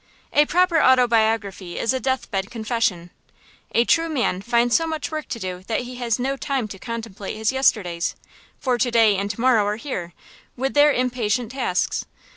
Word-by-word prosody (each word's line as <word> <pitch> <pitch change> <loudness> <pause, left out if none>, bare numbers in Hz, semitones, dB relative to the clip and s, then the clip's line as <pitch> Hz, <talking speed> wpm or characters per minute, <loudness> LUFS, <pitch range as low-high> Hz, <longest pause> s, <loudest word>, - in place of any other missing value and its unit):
A 295 0 +5
proper 355 -1 +3
autobiography 225 -7 +2
is 230 - 0
a 260 - -1
death 260 0 -2
bed 195 -1 -2
confession. 220 -6 -2 0.6
A 235 - +4
true 330 +4 +2
man 245 - 0
finds 235 +2 +2
so 330 - +2
much 315 -1 -4
work 310 -1 -4
to - - -4
do 185 -4 -5
that 225 - 0
he 250 0 -8
has 235 -3 0
no 265 +2 -1
time 270 -4 -2
to 195 - -9
contemplate 225 -4 -6
his 220 +2 +1
yesterdays; 200 -10 +1 0.4
for 250 -2 -1
to 245 +2 +2
day 225 -3 +4
and 200 +1 -2
to 205 - -5
morrow 240 -3 +4
are 210 - 0
here, 195 - -5 0.4
with 265 +2 -1
their 295 0 +6
impatient 245 -3 -1
tasks. 250 -9 -1
235 Hz, 185 wpm, -22 LUFS, 210-260 Hz, 0.6 s, their